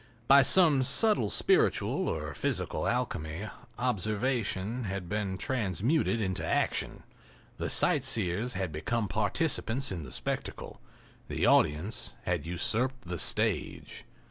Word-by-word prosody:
By 140 +1 +8
some 155 -3 +5
subtle 140 - +3
spiritual - - +2
or - - -4
physical - - -2
alchemy 80 +7 -3 0.3
observation 115 -1 -1
had 95 -2 -5
been 100 -1 -3
transmuted 115 - 0
into 95 -4 -2
action—the - - -4
sightseers 105 +3 +2
had 95 -3 -3
become 105 +9 -2
participants 110 - 0
in 90 -3 -4
the 65 -4 -10
spectacle—the - - -5
audience 95 +11 +1
had 85 -3 -2
usurped 120 +9 0
the 90 -1 -4
stage. - - -1
105 Hz, 105 wpm, -29 LUFS, 90-125 Hz, 0.3 s, By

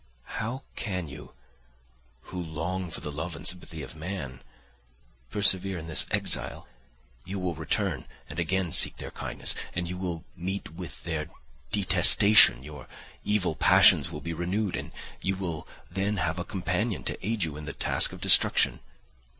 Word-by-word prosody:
How 125 +5 -4
can 90 -6 -3
you, 75 +2 -11 0.9
who 90 - -7
long 85 +3 -4
for - - -3
the 75 - -5
love 80 +4 -5
and - - -10
sympathy 80 -3 -2
of 65 - -10
man, 80 -6 -6 0.9
persevere 95 -2 +3
in 80 - -7
this 80 -2 +3
exile? - - -1 0.6
You 100 +1 -6
will 90 -2 -2
return 80 -1 -2 0.2
and 75 - -7
again 90 +1 0
seek - - +1
their - - -7
kindness, - - -1 0.2
and 90 0 -2
you 90 +1 -5
will 85 -4 -4
meet 95 0 -4
with 85 0 -9
their 80 -2 -3 0.4
detestation; 95 - +6
your 75 -2 -10 0.4
evil 105 -5 0
passions 80 - +6
will 75 -2 -7
be 85 +2 -4
renewed, 90 +4 -2
and - - -6 0.3
you 95 0 -1
will 85 -5 -5 0.2
then 100 +3 -1
have 80 0 -1
a - - -2
companion 95 +2 -2
to - - -5
aid 110 +1 -1
you 80 -3 -3
in 75 0 -8
the 70 - -5
task - - +1
of - - -11
destruction. - - +6
90 Hz, 160 wpm, -27 LUFS, 80-95 Hz, 0.9 s, detestation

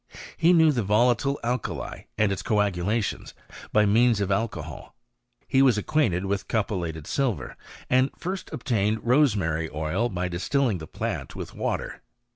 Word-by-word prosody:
He 170 +2 +4
knew 160 -3 +6
the 125 -5 0
volatile 120 +6 +2
alkali 120 0 -3
and 105 -2 +2
its 95 - -2
coagulations 105 0 -1 0.4
by 105 0 +4
means 115 +2 +4
of 100 -1 -1
alco 100 -5 -1
hol. 75 -3 -10 0.5
He 135 - +3
was 130 -5 +5
acquainted 105 - +1
with 100 +1 -2
cupeUated 85 -8 -2
silver, 120 - -2 0.3
and 130 +2 +3
first 185 +2 -5
obtained 110 -7 -1
rosemary 100 - +2
oil 80 +10 -1
by 90 -2 -2
distilling 105 +4 0
the 80 - -8
plant - - -4
with - - -7
water. - - -3
105 Hz, 145 wpm, -26 LUFS, 95-125 Hz, 0.5 s, knew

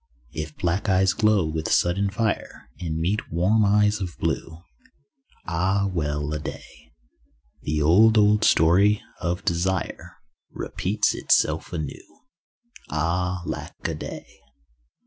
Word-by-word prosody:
If 75 -1 -6
black 90 +4 -1
eyes 95 0 +3
glow 105 -5 +2
with 80 0 -3
sudden 100 +3 +2
fire 100 - -3
And 80 -3 -3
meet 90 +7 -2
warm 95 +7 +2
eyes 105 +1 +3
of 90 -3 -5
blue— 80 +2 -3 0.8
(Ah, 95 +4 0
well 75 -2 -2
a 75 - -2
day). - - -10 0.7
The 75 0 -1
old, 110 +8 +5
old 105 0 +4
story 100 +6 +4 0.2
of 90 +1 -3
desire 90 +2 -2 0.3
Repeats 105 +3 -1
itself - - +1
anew. 80 -5 -7 0.7
(Ah, 90 +3 -1
lack - - -6
a - - -2
day.) - - -9
90 Hz, 120 wpm, -24 LUFS, 80-100 Hz, 0.8 s, old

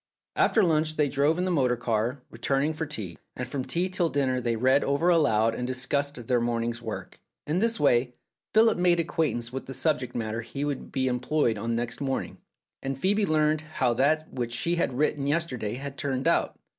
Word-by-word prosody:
After 220 - +3
lunch 155 -2 +2
they 150 -2 +2
drove 145 +4 +2
in 180 - 0
the 185 - 0
motor 130 -7 +2
car, 120 +2 -1
return 135 +4 0
ing 155 +2 0
for 155 0 -4
tea, 105 - -5 0.2
and 125 - -4
from 130 +1 -3
tea 175 +7 -1
till 185 -3 0
dinner 130 -3 0
they 120 -1 0
read 130 +5 +3
over 145 +5 +1
aloud 115 -10 +3
and 125 +2 -3
discussed 130 0 -1
their 120 0 +2
morning's 120 0 -1
work. 110 -2 -7 0.3
In 155 +4 0
this 230 +2 +1
way 125 -3 +2 0.4
Philip 220 -3 +4
made 175 -1 +3
acquaintance 150 -8 -1
with 135 - -5
the 135 - -5
subject 145 -6 0
matter 110 -1 -2
he 135 +5 -4
would 145 -2 -4
be 130 -1 0
employed 125 -2 0
on 115 +2 -1
next 120 +3 -3
morning, 135 -1 -3 0.4
and 135 -1 -3
Phcebe 200 +7 +1
learned 155 -1 +2
how 140 -6 0
that 155 +6 +1
which 120 -2 -3
she 170 +9 0
had 135 -7 0
written 145 -1 +1
yes 165 +4 +2
terday 120 -8 -4
had 140 +1 -7
turned 135 -2 -1
out. - - +1
135 Hz, 205 wpm, -27 LUFS, 120-155 Hz, 0.4 s, Philip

